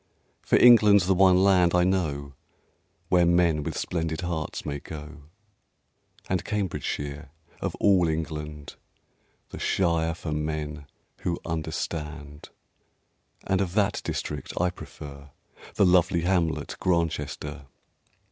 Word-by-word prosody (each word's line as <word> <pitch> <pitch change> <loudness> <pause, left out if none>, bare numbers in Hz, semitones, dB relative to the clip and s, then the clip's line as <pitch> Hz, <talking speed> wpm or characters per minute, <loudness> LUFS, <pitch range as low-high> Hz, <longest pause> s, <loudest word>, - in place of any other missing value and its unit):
For - - +1
England's 105 -6 +7
the 95 - +3
one 95 0 +5
land, 90 -3 +4
I 90 - +4
know, 75 -7 -1 0.8
Where 90 -1 +4
men 85 -3 +3
with - - -4
Splendid 80 -1 -2
Hearts 85 -3 -4
may 70 -1 -3
go; 75 0 -10 1.0
And 90 -2 -1
Cambridgeshire, 75 -7 -3 0.3
of - - -2
all 95 -4 +3
England, 75 -2 -5 0.7
The - - -7
shire 85 -3 +1
for 80 -2 -6
Men 75 -1 -3 0.3
who 85 -1 -2
Understand; 75 -2 -5 1.0
And 95 0 +1
of 95 -1 -3
that 105 -1 +1
district 75 -3 -4
I 90 +1 +2
prefer 70 -5 -11 0.5
The - - +4
lovely 90 -1 +3
hamlet 85 -2 0
Grantchester. 75 -4 -2
80 Hz, 115 wpm, -26 LUFS, 75-90 Hz, 1.0 s, England's